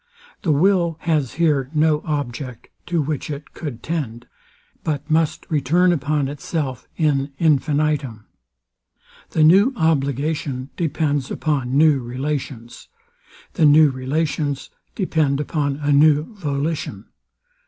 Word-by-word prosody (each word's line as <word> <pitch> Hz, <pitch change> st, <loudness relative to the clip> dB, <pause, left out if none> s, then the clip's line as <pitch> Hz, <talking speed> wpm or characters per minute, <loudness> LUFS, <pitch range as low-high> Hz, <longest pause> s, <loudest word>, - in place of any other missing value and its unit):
The 165 Hz, -, +1 dB
will 170 Hz, +1 st, +2 dB
has 155 Hz, -7 st, 0 dB
here 145 Hz, -4 st, +1 dB
no 155 Hz, 0 st, +3 dB
object 135 Hz, -5 st, -4 dB, 0.2 s
to 170 Hz, -3 st, 0 dB
which 150 Hz, 0 st, -3 dB
it 145 Hz, 0 st, -7 dB
cou'd 135 Hz, -8 st, -7 dB
tend; 125 Hz, -8 st, -4 dB, 0.6 s
but 150 Hz, 0 st, -3 dB
must 160 Hz, -1 st, +1 dB
return 165 Hz, +5 st, +2 dB
upon 145 Hz, -2 st, 0 dB
itself 140 Hz, -2 st, -4 dB
in 145 Hz, -3 st, +1 dB
infinitum. 145 Hz, -6 st, +1 dB, 1.0 s
The 155 Hz, -, +2 dB
new 195 Hz, -, +6 dB
obligation 140 Hz, -, -1 dB
depends 145 Hz, -4 st, -1 dB
upon 135 Hz, -4 st, -1 dB
new 150 Hz, -2 st, +5 dB
relations. 125 Hz, -1 st, -5 dB, 0.7 s
The 165 Hz, -, +3 dB
new 150 Hz, 0 st, +6 dB
relations 145 Hz, +2 st, -2 dB, 0.2 s
depend 155 Hz, -7 st, +1 dB
upon 145 Hz, -2 st, -1 dB
a 145 Hz, 0 st, -1 dB
new 150 Hz, +6 st, +4 dB
volition. 150 Hz, -4 st, -3 dB
150 Hz, 110 wpm, -21 LUFS, 135-160 Hz, 1.0 s, new